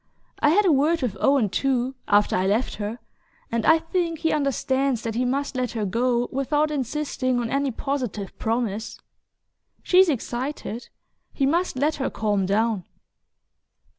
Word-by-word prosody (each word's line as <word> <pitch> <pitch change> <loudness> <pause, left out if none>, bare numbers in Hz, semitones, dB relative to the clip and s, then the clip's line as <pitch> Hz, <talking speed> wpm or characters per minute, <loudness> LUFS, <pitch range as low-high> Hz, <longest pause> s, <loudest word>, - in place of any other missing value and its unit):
I 290 - +4
had 405 +7 +4
a 360 - +5
word 300 +2 +2
with 225 -6 -1
Owen, 275 -5 +3
too, 260 +3 0
after 205 0 +3
I 185 +1 +1
left 220 +6 0
her, 210 +2 -4 0.5
and 230 -1 0
I 320 - +7
think 330 0 -2
he 320 +1 0
understands 275 -3 0
that 225 - -3
he 245 +3 0
must 275 +2 -1
let 250 -1 -1
her 220 -3 -2
go 240 +4 +1
without 295 +3 0
insisting 260 -2 -1
on 230 -1 -3
any 275 0 +1
positive 245 -6 -4
promise. 225 -2 -2 0.8
She's 370 0 +5
excited... 250 -2 -4 0.4
he 275 - +1
must 340 +4 +1
let 295 +4 0
her 270 - -1
calm 205 -3 0
down..." 215 -1 +1
255 Hz, 155 wpm, -24 LUFS, 225-290 Hz, 0.8 s, I